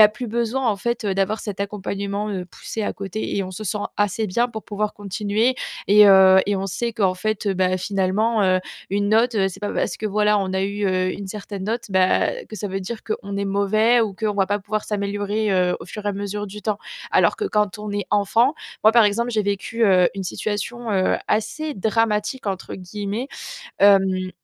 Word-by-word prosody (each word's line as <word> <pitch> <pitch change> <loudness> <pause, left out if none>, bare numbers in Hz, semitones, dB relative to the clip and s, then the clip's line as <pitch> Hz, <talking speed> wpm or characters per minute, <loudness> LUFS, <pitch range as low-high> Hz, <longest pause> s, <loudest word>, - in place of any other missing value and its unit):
a 210 - +9
plus 235 +3 -6
besoin 235 +3 -1
en 210 - +1
fait, 235 +1 -2
heu, 195 -2 0
d'avoir 195 +3 0
cet 200 -2 -6
accompagnement, 200 +1 -3
heu, 185 -3 -3
poussé 215 +4 -6
à - - -1
côté. 200 +2 -4
Et 195 - 0
on 185 - -7
se 215 - -7
sent 210 +1 -2 0.2
assez 205 +1 0
bien 235 +6 +1
pour 220 -2 -7
pouvoir 210 0 -2
continuer 205 +5 0 0.3
et 210 +1 +7
heu 190 -1 +8
et 205 -1 +1
on 195 +1 -2
sait 235 +5 -2
qu'en 195 -5 +1
fait 215 +3 -2
heu, 195 - +1
bah 185 0 +1
finalement, 200 +4 +1
heu 185 -1 +3 0.3
une 200 0 0
note, 230 +3 +4 0.2
c'est 195 +2 -10
pas 205 - -2
parce 175 - -1
que, 215 - -3
voilà, 210 0 +2
on 190 -1 -2
a 190 0 0
eu, 200 +1 -2
heu, 185 -1 +1
une 200 -1 -7
certaine 200 -1 -6
note, 230 +3 -2
bah 190 -1 +3 0.3
que 215 - -8
ça 205 - -4
veut 195 0 -3
dire 220 +4 -5
qu'on 200 -3 -4
est 200 - -1
mauvais 215 +4 +3
ou 215 -4 0
qu'on 210 +1 -1
va 195 -2 +1
pas 205 +1 0
pouvoir 210 +1 -3
s'améliorer, 205 +1 -1
heu, 180 -1 +2
au - - -8
fur 210 -1 -8
et - - +2
à 205 - 0
mesure 205 +1 -4
du 210 +2 -9
temps. 215 -2 -1 0.3
Alors - - +3
que 425 - -3
quand 210 - 0
on 210 0 -5
est 205 0 -3
enfant, 225 +7 +3 0.3
moi, 215 - +7
par 235 -2 +6
exemple 235 +4 +1
j'ai 220 -3 +1
vécu, 205 +3 -1
heu, 185 -3 +5
une 195 - -4
situation, 220 +4 -3
heu, 190 -1 +2
assez 230 +9 -1
dramatique 220 +3 0
entre 190 -1 -3
guillemets. 205 +6 -5 0.5
Hem, 190 -2 +4
205 Hz, 220 wpm, -22 LUFS, 195-215 Hz, 0.5 s, a